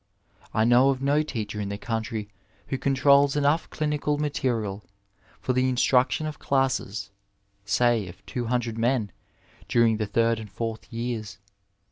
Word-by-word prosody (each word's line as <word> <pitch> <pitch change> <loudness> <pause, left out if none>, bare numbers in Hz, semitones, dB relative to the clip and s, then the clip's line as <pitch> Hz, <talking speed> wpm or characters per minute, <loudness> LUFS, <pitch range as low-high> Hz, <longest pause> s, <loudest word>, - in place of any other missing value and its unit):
I 110 - +2
know 120 +3 +5
of 135 -1 0
no 145 +2 +3
teacher 110 -8 -4
in 100 - -3
the 100 - -4
country 110 -1 -3 0.4
who 135 - -2
controls 140 +1 +4
enough 145 +3 +2
clinical 150 -1 -1
material 115 -9 -1 0.6
for 130 - -1
the 130 +1 +2
instruction 130 +4 +2
of 155 -1 -5
classes 130 -7 -1 0.5
say 115 0 +2
of 90 +1 -13
200 120 -2 -2
men 115 -4 +1 0.6
during 115 -2 +3
the 105 -1 -2
third 115 +2 +2
and 110 -1 -8
fourth 115 +1 -5
years. 115 -2 -4
120 Hz, 140 wpm, -26 LUFS, 110-135 Hz, 0.6 s, know